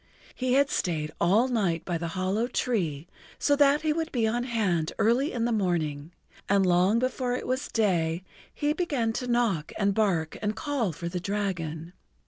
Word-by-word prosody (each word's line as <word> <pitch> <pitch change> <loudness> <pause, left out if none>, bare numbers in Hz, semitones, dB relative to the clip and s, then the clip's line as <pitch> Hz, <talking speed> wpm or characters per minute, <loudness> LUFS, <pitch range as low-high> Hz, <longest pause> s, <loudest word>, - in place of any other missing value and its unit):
He 255 -1 -1
had 280 +1 +3
stayed 155 -4 -1
all 205 +9 +4
night 190 -10 0
by 170 -2 -2
the 170 - -3
hollow 195 +5 0
tree 175 - -1 0.3
so 290 - +2
that 285 +1 +4
he 310 -1 +2
would 325 +1 -3
be 235 -4 +1
on 240 +2 -1
hand 195 -10 0
early 245 +7 +2
in 235 -2 -1
the 240 - 0
morning, 165 -7 -1 0.4
and 200 -1 +4
long 180 +4 +3
before 255 0 0
it - - -4
was 260 +3 -1
day 175 -6 0 0.3
he 295 0 0
began 280 -10 -1
to 250 +2 -3
knock 235 -10 +1
and 200 -1 +2
bark 185 -7 0
and 210 0 -1
call 280 - -1
for 170 +2 -6
the 180 +1 -3
dragon. 175 -4 -3
210 Hz, 180 wpm, -27 LUFS, 175-250 Hz, 0.4 s, all